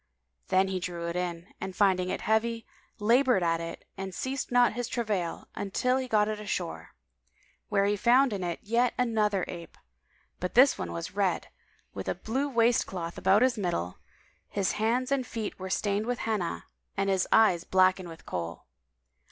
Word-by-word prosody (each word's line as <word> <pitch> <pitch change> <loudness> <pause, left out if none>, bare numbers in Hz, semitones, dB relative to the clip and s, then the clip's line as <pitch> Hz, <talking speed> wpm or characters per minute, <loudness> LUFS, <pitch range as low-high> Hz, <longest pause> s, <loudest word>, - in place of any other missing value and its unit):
Then 190 +1 +3
he 190 -1 -1
drew 175 -1 -4
it 170 - -4
in 175 0 -4
and 190 - -5
finding 185 -2 +2
it - - -3
heavy, 230 +1 0 0.3
laboured 235 -1 +3
at 165 -1 +1
it 165 0 -7
and 190 -2 -5
ceased 265 0 -3
not 245 -1 +4
his 245 +1 -3
travail 210 -9 -2 0.3
till 250 +1 +2
he 260 -1 -2
got 210 -3 +3
it 215 -1 -3
ashore, 185 -5 -4 0.7
when 200 0 +2
he 205 - +2
found 245 +4 +4
in 195 -2 -3
it 175 -1 -3
yet 235 +3 +1
another 215 -6 +1
ape; 170 -1 -9 0.6
but 180 - -4
this 265 +3 +7
one 85 - -5
was 85 0 -5
red, - - 0 0.4
with 95 -1 -6
a 95 - 0
blue 265 +6 -2
waistcloth 230 -8 +1
about 205 +5 +4
his 255 -4 +2
middle; 90 - -2 0.5
his 200 -2 0
hands 240 +5 0
and 270 -2 0
feet 220 -4 -5
were 190 0 -5
stained 205 +3 0
with 245 0 0
Henna 210 -6 -2 0.3
and 195 0 +1
his 190 -2 +1
eyes 185 -6 +5
blackened 185 -1 +2
with 165 -1 -12
Kohl. 85 -1 -5
205 Hz, 175 wpm, -28 LUFS, 180-235 Hz, 0.7 s, this